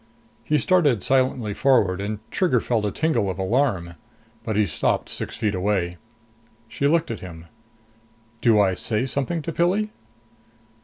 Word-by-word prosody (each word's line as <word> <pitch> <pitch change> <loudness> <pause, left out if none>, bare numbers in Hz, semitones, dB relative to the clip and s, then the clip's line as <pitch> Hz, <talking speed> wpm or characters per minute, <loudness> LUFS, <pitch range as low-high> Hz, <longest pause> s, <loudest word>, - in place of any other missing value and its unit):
He 150 - +1
started 145 - +2
silently 130 -5 +1
forward 100 -8 +2
and 105 +1 -3
Trigger 175 -10 +2
felt 115 -2 -1
a 105 - -1
tingle 155 -10 0
of 95 - -4
alarm. 95 -4 0 0.5
But 110 -2 -3
he 105 0 +3
stopped 75 -5 -1
six - - -5
feet 110 -3 0
away. 90 -2 -1 0.7
She 140 +5 -1
looked 165 -2 +1
at 115 - -5
him. 85 -3 -10 1.0
"Do 115 -3 +4
I 95 -2 +3
say 110 +6 0
something 140 +5 -2
to 165 - -4
Pilli?" 195 +6 +1
115 Hz, 150 wpm, -23 LUFS, 100-145 Hz, 1.0 s, Do